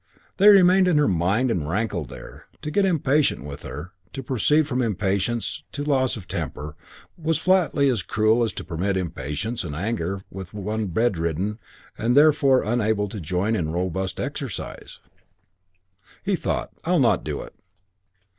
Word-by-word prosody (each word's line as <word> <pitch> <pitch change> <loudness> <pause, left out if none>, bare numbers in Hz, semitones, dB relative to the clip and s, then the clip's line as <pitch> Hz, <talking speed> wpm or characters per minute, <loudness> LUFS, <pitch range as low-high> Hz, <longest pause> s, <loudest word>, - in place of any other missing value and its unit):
They 200 +1 +5
remained 190 -2 +7
in 175 -4 +3
her 150 - +4
mind 100 +7 +1
and 75 -7 -1
rankled 95 - -2
there. - - -11 0.2
To 150 - -3
get 200 +5 +3
impatient 150 - +2
with 70 0 -8
her, 75 +6 -7 0.2
to 135 - -5
proceed 140 +5 +2
from 130 -3 0
impatience 105 +1 -1
to 145 - -3
loss 130 -4 +1
of 90 -4 -10
temper, 75 0 -5 0.4
was 165 -2 0
flatly 170 -5 +3
as 120 -7 +1
cruel 110 +5 +2
as 115 - 0
to - - -6
permit 95 +3 -1
impatience 85 - -3
and 75 -4 -5
anger 95 0 -2
with 95 +1 -8
one 105 +1 -2
bedridden 95 0 -1 0.4
and 120 +4 +2
therefore 145 -3 +5
unable 110 -2 0
to 100 -1 -6
join 90 +7 0
in 80 -6 -1
robust 95 +2 -2
exercises. - - -6 1.2
He - - +1
thought, - - -2
"I'll - - +2
not - - +3
do - - -3
it." - - -13
110 Hz, 155 wpm, -24 LUFS, 90-135 Hz, 1.2 s, remained